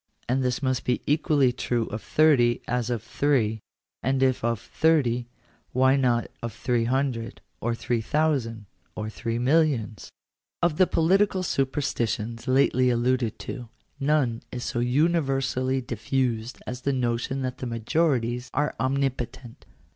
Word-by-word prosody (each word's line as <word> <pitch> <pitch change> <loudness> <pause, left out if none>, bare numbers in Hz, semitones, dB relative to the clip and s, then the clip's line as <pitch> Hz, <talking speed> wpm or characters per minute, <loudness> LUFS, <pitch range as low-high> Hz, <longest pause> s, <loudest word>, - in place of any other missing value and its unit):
And 130 +2 +1
this 125 +1 -1
must 130 -1 0
be 125 - -1
equally 145 -3 +2
true 120 -2 -1
of 110 +1 -5
thirty 125 -4 +3
as 125 -1 -1
of 120 -3 -2
three: 120 -3 +1 0.4
and 130 +1 +1
if 130 -3 +2
of 115 -2 0
thirty, 125 -3 +1 0.5
why 130 +1 +4
not 125 -3 +2 0.2
of 115 -2 -4
three 120 -1 0
hundred, 125 -2 -1 0.2
or 120 0 -1
three 115 0 -1
thousand, 125 -5 0 0.3
or 110 0 -4
three 115 0 -3
millions? 125 -5 +1 0.5
§4. 175 - +5
Of 150 - -10
the 185 - +5
political 190 +3 +2
superstitions 120 -6 -1
lately 130 -1 +3
alluded 120 -1 +1
to, 125 -4 -6 0.3
none 135 -5 +1
is 125 -1 -5
so 120 - -2
universally 135 -1 +1
diffused 120 0 -2
as 125 0 -5
the 140 +2 0
notion 125 +1 -1
that 130 -1 -4
majorities 120 0 0
are 145 +2 0
omnipo 130 -2 0
tent. 120 -3 -14
125 Hz, 140 wpm, -26 LUFS, 120-140 Hz, 0.5 s, 4